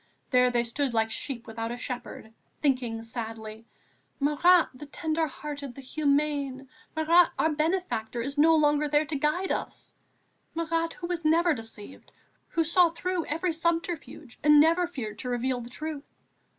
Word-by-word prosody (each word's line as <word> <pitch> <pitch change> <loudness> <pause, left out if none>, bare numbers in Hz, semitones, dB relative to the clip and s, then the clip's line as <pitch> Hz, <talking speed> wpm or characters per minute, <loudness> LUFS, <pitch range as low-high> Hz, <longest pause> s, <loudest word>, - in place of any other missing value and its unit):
There 250 -1 +5
they 240 -1 +1
stood 240 +1 -2
like 220 0 +1
sheep 245 -2 -5
without 225 0 -4
a 240 - -4
shepherd, 245 -3 -7 0.3
thinking 250 -5 0
sadly: 225 -1 -7 0.5
"Marat, 320 +5 +4
the 285 +3 -10
tender 320 +2 -1
hearted, 285 -3 -7
the 275 - -9
humane, 280 -1 0 0.3
Marat 330 +2 +5
our 320 - +2
benefactor, 305 -8 -1
is 275 +4 -3
no 320 +2 +5
longer 295 -1 +3
there 295 +1 +2
to 295 0 -4
guide 305 +7 0
us, - - -4 0.6
Marat 330 0 -1
who 350 - -7
was 345 -1 -3
never 330 +2 +4
deceived, 225 -1 -9 0.4
who 330 - 0
saw 340 +2 +4
through 345 +1 -2
every 330 +3 -1
subterfuge 330 -5 -3
and 300 0 +7
never 335 +3 +4
feared 220 -10 -6
to 250 - -4
reveal 245 +1 -1
the 235 - -9
truth!... 300 +2 -5
295 Hz, 155 wpm, -28 LUFS, 245-325 Hz, 0.6 s, and